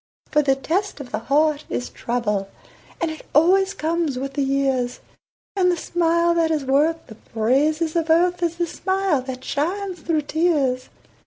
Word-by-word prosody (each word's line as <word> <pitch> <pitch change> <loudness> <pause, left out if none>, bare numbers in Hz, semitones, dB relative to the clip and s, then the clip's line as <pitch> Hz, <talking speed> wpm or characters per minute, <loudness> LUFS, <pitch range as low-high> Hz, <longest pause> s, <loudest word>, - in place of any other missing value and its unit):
For 300 - +4
the 270 -2 +2
test 355 +7 -2
of 260 -3 -9
the - - -2
heart 295 +5 +1
is 245 - -3
trouble, 210 -5 -2 0.5
And 335 -2 -1
it 315 - -9
always 380 +5 +4
comes 320 -3 -1
with 275 +1 -4
the 280 - -1
years, 270 -2 0 0.6
And 365 -2 +3
the 350 - -1
smile 340 0 +1
that 335 -1 +2
is 305 -4 -1
worth 300 +5 +2
the - - -11
praises 285 +10 0
of 330 -1 0
earth 350 +2 +3
Is 340 -1 0
the 345 0 0
smile 380 -3 0
that 255 0 -7
shines 365 +5 -2
through 315 -1 0
tears. 290 -5 0
310 Hz, 170 wpm, -22 LUFS, 270-340 Hz, 0.6 s, For